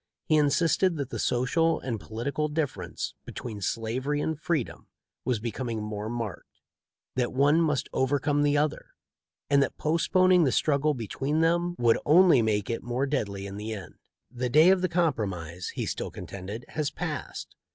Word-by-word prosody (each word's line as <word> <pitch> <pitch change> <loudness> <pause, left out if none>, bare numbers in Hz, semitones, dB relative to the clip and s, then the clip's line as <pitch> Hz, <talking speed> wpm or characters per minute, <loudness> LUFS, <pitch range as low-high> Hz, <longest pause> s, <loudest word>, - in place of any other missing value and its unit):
He 155 - +3
insisted 165 +4 +3
that 140 -3 -4
the - - -4
social 155 +7 +1
and 120 -4 -4
political 135 +9 -3
difference 140 - -3
between 110 -4 -7
slavery 125 +8 -1
and 160 +2 -1
freedom 155 -4 -3 0.4
was 125 -4 0
becoming 115 0 -3
more 105 0 -4
marked; 115 -5 -6 0.5
that 125 -1 0
one 145 +5 +4
must 150 -4 +1
overcome 145 +2 +1
the 145 0 +3
other; 150 0 -1 0.5
and 140 -1 +4
that - - -1
postponing 180 +3 +3
the 135 - +2
struggle 150 +3 +2
between 135 +6 -2
them 175 +1 +2
would 115 -1 +3
only 165 -3 +6
make 105 -2 0
it 115 - -2
the - - -14
more 125 +3 0
deadly 100 -9 -2
in 100 0 -7
the 110 +2 -4
end. 100 -3 -8 0.4
"The 125 0 -2
day 155 +8 +6
of 190 -1 +3
compro 165 - +1
mise," 85 0 -6
he - - -2
still - - -3
contended, 100 +5 -7
"has 150 -2 -1
passed. - - -5
135 Hz, 165 wpm, -27 LUFS, 115-155 Hz, 0.5 s, only